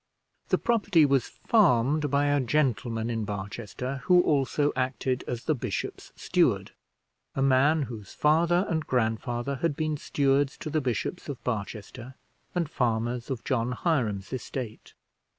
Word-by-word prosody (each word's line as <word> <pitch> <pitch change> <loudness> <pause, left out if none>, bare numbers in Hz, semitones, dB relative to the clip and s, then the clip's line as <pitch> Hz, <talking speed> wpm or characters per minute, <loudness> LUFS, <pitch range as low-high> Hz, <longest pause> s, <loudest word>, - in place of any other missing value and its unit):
The - - +3
property 200 -9 +3
was 135 -3 +2
farmed 150 - +2
by 140 +1 +2
a 145 0 +3
gentleman 120 -4 0
in 115 -1 -2
Barchester, 105 +6 -5
who 180 -1 +6
also 145 0 +1
acted 130 0 -1
as 120 -1 -4
the 155 - +1
bishop's 130 - -4
steward, - - +1 0.6
a 135 - +1
man 140 +4 +4
whose 110 -5 -8
father 170 +4 +3
and 160 -2 -1
grandfather 120 +2 -1
had 165 +1 0
been 155 -1 -1
stewards 140 -1 +1
to 155 - -6
the 155 0 +1
bishops 130 - -3
of 135 -3 -6
Barchester, 115 +3 -5 0.4
and 170 -3 +1
farmers 120 -3 -1
of 125 -4 -3
John 125 -2 0
Hiram's 120 - -1
estate. 125 -3 -6
130 Hz, 140 wpm, -27 LUFS, 120-150 Hz, 0.6 s, who